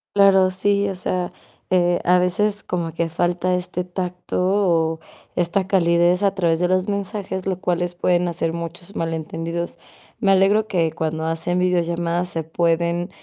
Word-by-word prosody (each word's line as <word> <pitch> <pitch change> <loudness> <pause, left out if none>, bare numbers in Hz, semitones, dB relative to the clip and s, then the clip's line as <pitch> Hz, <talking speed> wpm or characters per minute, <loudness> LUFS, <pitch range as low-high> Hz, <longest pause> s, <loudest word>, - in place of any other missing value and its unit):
Claro, 195 -2 +6
sí. 200 +2 +1
O 190 - -4
sea, 180 0 -2 0.4
eh, 175 -1 +2
a 180 +1 +4
veces 205 +3 0
como 170 -2 -3
que 170 0 -1
falta 175 +2 0
este 180 0 -3
tacto 180 0 -4
o 170 -5 +2 0.4
esta 180 +2 0
calidez 175 -1 +3
a 195 -1 +2
través 170 -3 +1
de 180 - +2
los 185 +1 +1
mensajes, 200 -1 -3
lo 185 -1 -2
cuales 175 -1 -1
pueden 175 0 +1
hacer 165 -1 -1
muchos 170 +3 -7
malentendidos. 165 +1 -3 0.4
Me 195 -4 +3
alegro 200 +3 +4
que 165 -4 +1
cuando 160 0 -3
hacen 165 +2 -1
videollamadas 175 -1 0
se 165 -2 -3
pueden 170 +2 0
175 Hz, 155 wpm, -21 LUFS, 170-185 Hz, 0.4 s, Claro